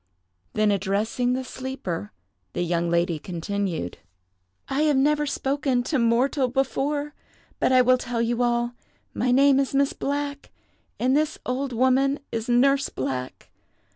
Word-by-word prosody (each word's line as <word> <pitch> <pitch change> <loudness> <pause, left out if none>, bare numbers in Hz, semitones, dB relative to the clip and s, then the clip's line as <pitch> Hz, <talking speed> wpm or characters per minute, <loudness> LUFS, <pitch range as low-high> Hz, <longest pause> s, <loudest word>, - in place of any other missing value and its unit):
Then 215 -1 +2
addressing 210 +5 0
the 260 +1 -2
sleeper, 260 - -5 0.4
the - - -1
young 170 0 0
lady 170 -1 +1
continued, 180 - -3 0.7
"I 275 +2 0
have 300 -3 +3
never 295 +2 +2
spoken 270 -2 0
to 285 +2 0
mortal 250 +4 +2
before; 280 +3 -1 0.5
but - - +2
I 255 -1 +6
will 255 0 +4
tell 240 -1 -3
you 235 +1 0
all. 240 0 +1 0.4
My 250 - 0
name 275 +2 +5
is 275 0 -1
Miss 280 0 +2
Black; 285 0 -3 0.5
and 255 +2 +2
this 310 +1 +1
old 260 +2 -2
woman 260 +3 +2
is 225 +1 -3
Nurse 275 +3 +3
Black. 130 -1 -5
255 Hz, 140 wpm, -25 LUFS, 215-275 Hz, 0.7 s, I